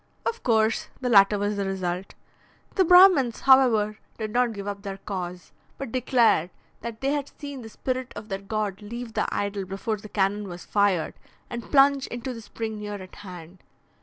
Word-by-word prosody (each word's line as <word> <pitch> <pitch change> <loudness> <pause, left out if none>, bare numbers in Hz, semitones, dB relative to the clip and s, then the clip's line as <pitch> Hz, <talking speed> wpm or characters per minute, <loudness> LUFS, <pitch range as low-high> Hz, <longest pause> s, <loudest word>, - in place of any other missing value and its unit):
Of 460 - -2
course; 220 -2 +2
the 250 - -2
latter 205 -2 +6
was 205 +1 -1
the 200 - -1
result. 185 -1 -3 0.6
The 380 - +4
Brahmins, 360 - +6
however, 230 -6 +4 0.2
did 215 -2 -4
not 245 +1 +2
give 200 -2 -7
up 200 -1 -4
their 195 -1 -6
cause, 180 -3 -6 0.3
but 275 -4 -6
declared 235 -8 +3 0.3
that 230 -1 -7
they 270 +1 +1
had 285 -1 -2
seen 285 -3 -7
the 225 - -9
spirit 255 +2 -3
of 215 - -8
their 195 -2 -3
god 205 -1 -3
leave 235 +2 -7
the - - 0
idol 200 -1 -2
before 195 +4 -3
the 210 +1 -11
cannon 200 +1 0
was 175 -1 -8
fired, 200 -5 +1 0.4
and 240 - -4
plunge 275 -1 +4
into 245 +2 -5
the 230 - -8
spring 220 0 -5
near 210 0 -5
at 185 -2 -10
hand. 180 -3 -10
215 Hz, 185 wpm, -25 LUFS, 195-245 Hz, 0.6 s, latter